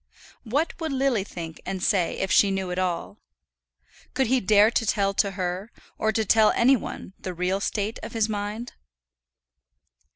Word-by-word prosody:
What 280 +8 0
would 320 -2 -2
Lily 265 -6 +1
think 165 -5 -8
and 190 -1 -4
say 190 -7 +1
if 190 - -2
she 200 - +5
knew 190 -2 -2
it 180 - -2
all? 185 +3 -2 1.0
Could 265 - +2
he 260 +3 +2
dare 210 +2 +5
to 235 - +1
tell 200 -2 +1
her, 190 +1 -4 0.3
or 220 - +2
to 220 0 0
tell 215 +1 +5
any 260 +3 +5
one 200 -5 -7
the 185 -1 -6
real 180 +3 0
state 210 +2 -2
of - - -8
his 225 -2 +1
mind? 210 +3 -4
205 Hz, 165 wpm, -25 LUFS, 190-225 Hz, 1.0 s, she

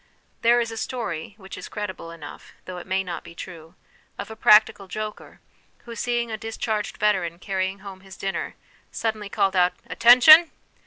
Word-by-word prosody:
There 240 +1 +4
is 230 -1 -2
a 225 - -7
story, 210 -8 -5
which 190 -2 -10
is - - -9
credible 190 -5 -6
enough, 160 -3 -11
though 180 -1 -7
it 175 - -12
may 190 0 0
not 175 -2 -6
be 170 - -13
true, 170 -1 -10 0.4
of - - -7
a - - -8
practical 215 -2 +4
joker 215 +3 -7 0.4
who, 235 - -8
seeing 240 -1 -2
a 220 - -3
discharged 220 -1 -4
veteran 185 -5 0
carry 190 +1 -2
ing 195 +1 -10
home 195 -1 -9
his 190 -1 -13
dinner, 195 0 -4 0.4
suddenly 220 -2 -3
called 195 -2 0
out 180 0 +3
' - - -36
Attention 310 +8 +7
205 Hz, 180 wpm, -24 LUFS, 185-225 Hz, 0.4 s, Attention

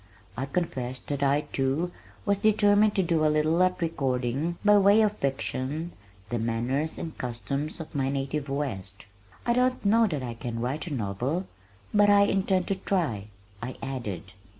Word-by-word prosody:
I 130 +4 -3
confessed 130 -5 -3
that 140 -1 -2
I 140 +1 +3
too 140 +6 0 0.3
was 200 -1 +2
determined 210 0 +4
to 190 - +3
do 165 -2 +1
a 155 - +4
little 155 +3 +2
at 185 0 +2
recording 135 +1 -1
by 210 0 +7
way 200 +2 +6
of 210 -1 +1
fiction 140 +4 -2 0.4
the 120 - 0
manners 120 +7 -1
and 160 - -5
customs 130 - -3
of 160 - -8
my 135 -2 0
native 140 +1 -2
West. 105 -9 -4 0.4
"I 235 - +3
don't 250 -1 +1
know 225 +3 +5
that 150 -8 -3
I 120 -2 -4
can 115 0 -5
write 135 +8 -2
a - - -5
novel, 125 - -2 0.5
but 205 -1 +5
I 205 0 +7
intend 190 -2 +2
to 195 - +2
try," 130 - -1 0.3
I 125 +2 -5
added. 105 -9 -5
145 Hz, 170 wpm, -27 LUFS, 125-185 Hz, 0.5 s, by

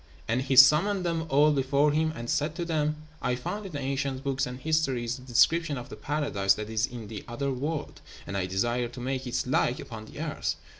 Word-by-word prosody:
And 120 +3 +1
he 135 0 0
summoned 160 +9 +6
them 165 -1 -1
all 145 +3 +5
before 140 +1 +2
him, 155 +1 +1
and 120 0 -6
said 150 +2 0
to 170 -1 -3
them, 155 -2 -1 0.2
"I 125 - 0
find 205 +11 -5
in - - -10
the 145 - -3
ancient 135 0 -2
books 135 -1 0
and 125 0 -7
histories 130 -6 0
the - - -13
description 145 +5 +3
of 120 - -7
the - - -7
paradise 120 -10 +1
that 105 +1 -6
is 110 +3 +1
in 120 -5 -8
the 105 -1 -7
other 135 +4 -2
world, 145 +4 -4 0.2
and 100 - -5
I 95 -2 -1
desire 120 +6 0
to 120 +2 -10
make 130 +1 -3
its 120 - -1
like 125 -1 +1
upon 110 -2 -8
the - - -11
earth. - - -2
135 Hz, 220 wpm, -28 LUFS, 120-150 Hz, 0.2 s, summoned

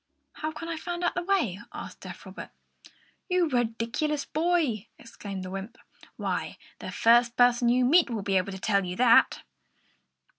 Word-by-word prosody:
"How 310 0 -4
can 330 +1 -8
I 335 -1 -3
find 350 +2 -5
out 350 - +1
the 355 - -2
way?" 345 - 0
asked - - -8
deaf - - -10
Robert. - - -9 0.8
"You 360 -2 +2
ridiculous 240 +4 -1
boy!" 310 - 0
exclaimed 200 -4 -8
the 185 - -7
wymp. 195 +4 -7 0.4
"Why, - - -3 0.2
the - - -6
first 235 +1 +4
person 245 -1 +4
you 250 +1 +3
meet 320 +4 +5
will 220 -4 -3
be 195 -1 +1
able 185 +2 -1
to 190 - -6
tell 200 0 +1
you 180 0 -4
that!" 240 +1 +4
240 Hz, 170 wpm, -27 LUFS, 210-315 Hz, 0.8 s, meet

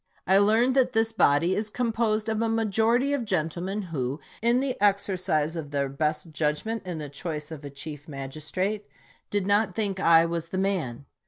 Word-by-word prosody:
I 190 +2 +5
learn 220 +5 +4
that 255 -1 +3
this 225 0 +2
body 165 -2 +3
is 210 +1 -2
composed 225 -2 0
of 220 0 0
a 230 - +1
majority 225 +5 +2
of 280 -4 0
gentlemen 185 +1 -2
who, 135 +1 -2 0.2
in 235 +2 +3
the 265 -1 -1
exercise 185 -6 +1
of 160 -3 -5
their 140 -1 -1
best 155 +4 -2
judgment 160 +8 -2
in 175 -3 -3
the 150 -1 -5
choice 150 +1 -5
of 155 -2 -8
a 145 - -6
chief 145 +1 -8
magistrate, 155 +9 -4 0.4
did 205 -2 0
not 205 -1 +2
think 200 -4 -1
I 165 -2 +6
was 170 0 -3
the 185 - -3
man. 165 -10 -1
190 Hz, 180 wpm, -26 LUFS, 155-220 Hz, 0.4 s, I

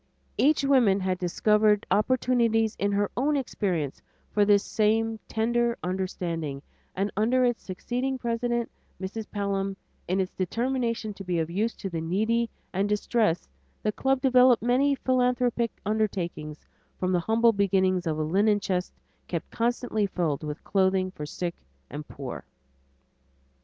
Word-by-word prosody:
Each 295 +1 +3
woman 250 -8 +4
had 185 -1 -1
discovered 210 +3 +3
opportunities 230 -1 +2
in 200 0 0
her 205 0 0
own 290 +4 +1
experience 180 - -2 0.3
for 205 -1 +3
this 205 0 +4
same 225 +1 +1
tender 235 +1 +1
understanding, 170 -6 -3 0.3
and 195 +2 -1
under 245 +5 +3
its 240 -1 0
succeeding 250 +8 -3
president, 240 -1 -1 0.3
Mrs. 205 +4 -5
Pelham, 195 -1 -2 0.3
in 185 +2 0
its 190 0 -1
determination 230 +2 -1
to 195 - -9
be 180 -2 -1
of 165 0 -1
use 215 +6 0
to - - -5
the 170 -3 -3
needy 220 +8 +1 0.2
and 195 +2 0
distressed, 210 -3 +1 0.4
the 215 - +1
club 265 +4 0
developed 250 -3 +5
many 265 +4 +3
philanthropic 250 -2 +1 0.2
undertakings 185 -8 -2 0.3
from 185 0 -1
the 180 - +3
humble 225 +5 +3
beginnings 190 -3 +2
of 155 -1 0
a 155 - 0
linen 205 +6 +3
chest 185 -2 -2 0.3
kept - - -4
constantly 230 -3 0
filled 165 -7 -1
with 150 0 -5
clothing 190 -1 +1
for 150 -5 -7
the - - -9
sick 170 +3 -3 0.4
and 150 +1 -6
poor. 135 -3 -7
210 Hz, 145 wpm, -27 LUFS, 185-235 Hz, 0.4 s, developed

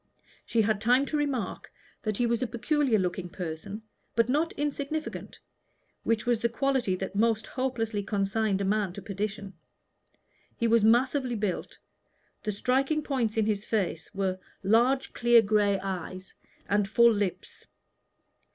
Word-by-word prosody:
She 225 -2 +2
had 210 -1 0
time 250 +5 +4
to 305 - -3
remark 275 -9 -2 0.3
that 215 -2 -2
he 245 - +2
was 235 -1 +1
a 255 - 0
peculiar 255 +1 +1
looking 180 -1 -2
person, 180 +5 -6 0.3
but 230 +1 +3
not 310 +5 +1
insignificant, 295 +1 -4 0.6
which 225 0 0
was 240 -2 +2
the 235 - +1
quality 260 -5 0
that 190 +1 -5
most 220 0 +2
hopelessly 235 -5 -2
consigned 200 0 0
a - - 0
man 200 -2 0
to 200 - -8
perdition. 200 0 -4 1.0
He 235 - +1
was 230 -1 +4
massively 250 +3 +3
built. 205 -4 -3 0.6
The 215 - -2
striking 270 +8 +1
points 240 -7 -1
in 220 - +3
his 210 -2 0
face 185 -8 -2
were 190 -2 -1 0.2
large 240 +7 +3
clear 240 -1 +5
gray 205 -1 +2
eyes 185 -1 -5 0.3
and 205 0 +2
full 235 +2 +6
lips. 205 -3 -4
220 Hz, 145 wpm, -28 LUFS, 200-245 Hz, 1.0 s, full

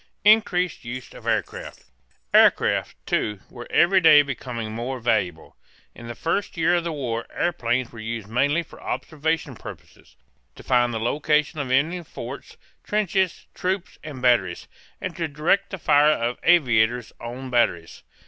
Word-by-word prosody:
INCREASED 185 -6 +3
USE 125 +1 -7
OF - - -12
AIRCRAFT. - - -3 0.5
Aircraft, - - +4
too, 105 -2 -1
were 120 -1 -9
every 185 +2 +4
day 155 -3 +8
becoming 120 -5 -5
more 120 +4 -4
valuable. 105 -8 -1 0.4
In 115 - -11
the 120 - -6
first 170 - -2
year 165 +2 +3
of 175 -1 +1
the 170 - -3
war 120 -6 -3
airplanes 125 -7 -1
were 115 - -11
used 110 -1 -5
mainly 145 +9 +1
for - - -16
observation 160 +1 -2
purposes: - - -13 0.4
to - - -13
find 120 -1 +2
the 115 - -3
location 150 +5 0
of 140 -3 -3
enemy 155 +7 +1
forts, - - -9 0.3
trenches, 195 -3 0
troops, 185 0 -3
and 145 -5 -8
batteries; 115 -8 +2 0.3
and - - -5
to 165 -2 -1
direct 155 +7 +1
the 190 - -5
fire 150 -3 +4
of 120 -2 -3
the - - 0
aviator's 120 -7 +3
own 125 +2 -7
batteries. 85 -9 0
130 Hz, 155 wpm, -24 LUFS, 120-165 Hz, 0.5 s, day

